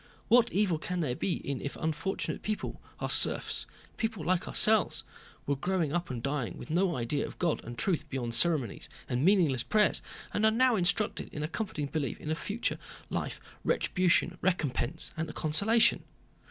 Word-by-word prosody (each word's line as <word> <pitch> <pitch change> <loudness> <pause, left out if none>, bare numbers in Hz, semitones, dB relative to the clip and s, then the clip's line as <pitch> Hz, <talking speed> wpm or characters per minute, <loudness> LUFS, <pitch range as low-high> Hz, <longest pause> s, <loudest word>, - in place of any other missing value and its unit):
What 240 0 +5
evil 185 -5 +1
can 180 +2 -2
there 130 -6 -1
be 180 - 0
in 140 -2 -2
it - - -9
if 140 - -4
unfortunate 160 +5 -2
people, 215 0 -4 0.2
our - - -2
serfs, - - +2 0.3
people 220 -8 -2
like 185 +1 +1
ourselves, 220 -1 +4 0.4
were 140 - +1
growing 170 0 -1
up 175 0 -1
and 120 -3 -5
dying 135 -8 -2
with - - -8
no 175 +1 +2
idea 125 +4 -1
of - - -11
God 170 -3 0
and 120 +1 -8
truth 155 - 0
beyond 125 -4 -3
ceremonies 150 - +1 0.2
and 125 +2 -1
meaningless 165 - +4
prayers 210 - +2 0.3
and 210 - 0
are 220 - +7
now 245 +2 +3
instructed 200 +3 0
in 150 - -4
a - - 0
comforting 170 -5 -3
belief 140 -4 -3
in 155 - -2
future 205 +8 -3 0.3
life, - - -3 0.2
retribution, 180 -1 +1
recompense, 160 -4 -1
and 160 -1 -3
consolation? 220 +10 +3
170 Hz, 170 wpm, -30 LUFS, 145-195 Hz, 0.4 s, are